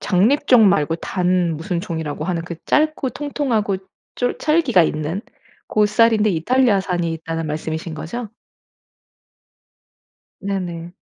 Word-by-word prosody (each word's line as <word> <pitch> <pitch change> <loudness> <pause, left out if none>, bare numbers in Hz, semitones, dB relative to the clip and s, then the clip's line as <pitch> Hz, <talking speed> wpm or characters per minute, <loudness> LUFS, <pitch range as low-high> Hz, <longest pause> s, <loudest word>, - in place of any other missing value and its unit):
장립종 225 +3 +4
말고 165 -4 +1
단 180 -2 0
무슨 170 +1 -3
종이라고 160 -3 -4
하는 175 -2 -2
그 175 - -6
짧고 305 -3 +1
통통하고 250 -8 -1 0.4
쫄 245 0 -1
찰기가 305 - +3
있는 155 +5 -2 0.5
고 210 -1 +2
쌀인데 215 0 +3
이탈리아 205 +5 +2
산이 175 -3 -2
있다는 165 0 -4
말씀이신 160 +2 -4
거죠? 220 +9 -5 2.1
네네. 175 -3 -4
185 Hz, 260 characters per minute, -20 LUFS, 165-230 Hz, 2.1 s, 장립종